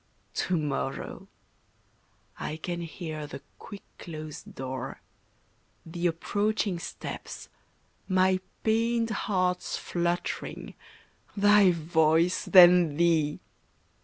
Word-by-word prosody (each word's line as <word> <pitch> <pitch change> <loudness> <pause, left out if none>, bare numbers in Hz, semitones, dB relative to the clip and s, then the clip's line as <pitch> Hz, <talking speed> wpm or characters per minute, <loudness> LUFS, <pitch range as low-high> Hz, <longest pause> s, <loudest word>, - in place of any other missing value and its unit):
To 185 - 0
morrow! 140 -3 -3 1.1
I 155 - -4
can 175 +2 -4
hear 160 -2 -6
the 140 -1 -9 0.2
quick 205 - -10 0.2
closed 155 -2 -8
door, 130 0 -5 0.9
The 170 +1 -1
approaching 205 +2 -1
steps, - - -7 0.6
my 185 0 +3 0.2
pained 230 +1 +1
heart's 185 -4 -1
fluttering, 175 0 -3 0.6
Thy 205 -1 +6
voice, 165 +1 +2
then 175 -4 +7
Thee! 160 -3 +2
175 Hz, 85 wpm, -28 LUFS, 155-185 Hz, 1.1 s, then